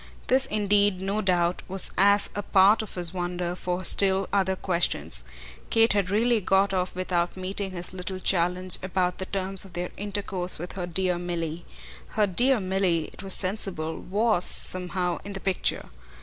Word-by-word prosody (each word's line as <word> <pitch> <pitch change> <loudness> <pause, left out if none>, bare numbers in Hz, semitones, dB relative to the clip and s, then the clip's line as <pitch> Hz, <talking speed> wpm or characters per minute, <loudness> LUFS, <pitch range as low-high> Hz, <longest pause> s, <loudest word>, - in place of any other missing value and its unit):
This 265 +1 +2
indeed, 205 -3 +2
no 195 +3 -2
doubt, 180 -2 0
was 190 0 +2
as 200 +1 +3
a 205 - -3
part 200 +2 +4
of 215 - -9
his 175 -1 0
wonder 175 -1 -3
for 180 0 -4
still 195 0 +3
other 190 -1 +1
questions. 80 - +3 0.4
Kate 225 -1 +3
had 200 -3 0
really 225 +3 +1
got 195 +1 +2
off 185 -1 -2
without 180 -1 -2
meeting 190 +1 -2
his 180 -1 -5
little 185 +1 -6
challenge 180 0 +1
about 185 -1 -2
the 190 - -4
terms 195 -1 +3
of 195 - -13
their 175 +1 -4
intercourse 195 -3 -3
with 175 +3 -7
her 180 -2 -5
dear 180 0 0
Milly. 170 -1 -4 0.5
Her 210 - +4
dear 245 +7 +2
Milly, 185 -4 -1
it - - -12
was 195 -1 +2
sensible, 185 -5 -2
WAS 210 -1 0
somehow 180 -1 +1
in 200 - -8
the 195 - -5
picture. 190 -1 -2
185 Hz, 170 wpm, -25 LUFS, 180-200 Hz, 0.5 s, part